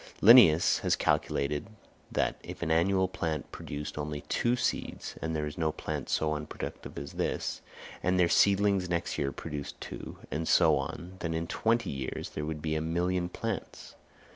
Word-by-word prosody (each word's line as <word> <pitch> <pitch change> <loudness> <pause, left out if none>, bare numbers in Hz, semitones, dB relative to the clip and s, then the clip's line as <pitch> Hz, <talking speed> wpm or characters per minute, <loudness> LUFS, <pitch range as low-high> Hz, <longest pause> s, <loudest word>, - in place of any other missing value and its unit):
Linnæus 100 -8 +7
has - - +2
calculated 75 +4 0 0.4
that - - 0
if - - -7
an 80 - -1
annual 95 +3 +3
plant 80 -5 -3
produced 75 +1 -6
only 75 0 -3
two 120 +9 +1
seeds—and 80 -8 -3
there 75 -1 -1
is 75 +1 -6
no 80 -1 +2
plant - - -5
so 75 -1 +1
unproductive 75 0 -6
as - - -6
this—and 90 +1 -3
their 90 - +5
seedlings 100 0 +3
next 85 -1 -1
year 70 -1 0
produced 70 0 -6
two, - - -7
and 80 +3 -2
so - - +5
on, 90 +2 -5
then 80 -1 -2
in 80 0 -1
twenty 115 +6 0
years 70 -1 -4
there 75 - -4
would 75 -1 -4
be 80 -1 -1
a 80 - 0
million 85 +2 0
plants. - - -5
80 Hz, 165 wpm, -30 LUFS, 75-90 Hz, 0.4 s, Linnæus